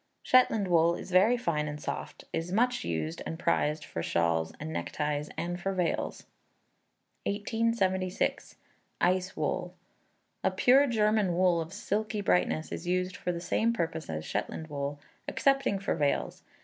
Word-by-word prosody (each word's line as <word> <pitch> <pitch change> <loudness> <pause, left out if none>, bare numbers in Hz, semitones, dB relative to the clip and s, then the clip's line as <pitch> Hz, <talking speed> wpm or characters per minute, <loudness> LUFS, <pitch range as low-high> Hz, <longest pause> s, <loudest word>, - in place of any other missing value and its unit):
Shetland 225 -5 +4
wool 170 -1 +4
is - - -8
very 200 +7 +5
fine 155 -10 -1
and 150 0 -5
soft, - - -5
is 165 +2 -2
much 245 +5 +2
used, 80 -1 -3
and 160 - -5
prized 150 -3 +1
for 85 - -4
shawls 85 -1 +1
and 160 +2 -5
neckties 150 -1 -2
and 175 +1 -3
for 195 - -1
veils. 180 -3 -1 1.0
1876. 205 -3 0 0.4
Eis 185 +1 +1
Wool. - - -2 0.7
A - - +4
pure 270 +3 +5
German 215 -6 +2
wool 180 -2 +3
of 160 +1 -6
silky 210 +2 -2
brightness, 180 -4 +1
is 175 - -5
used 185 +1 0
for 180 - -2
the 170 - -4
same 220 +6 +1
purpose 165 -6 -3
as 80 -1 -4
Shetland 160 0 -3
wool 145 0 -3 0.3
excepting 275 -7 +2
for 200 +1 -1
veils. 145 -1 0
180 Hz, 150 wpm, -30 LUFS, 155-210 Hz, 1.0 s, very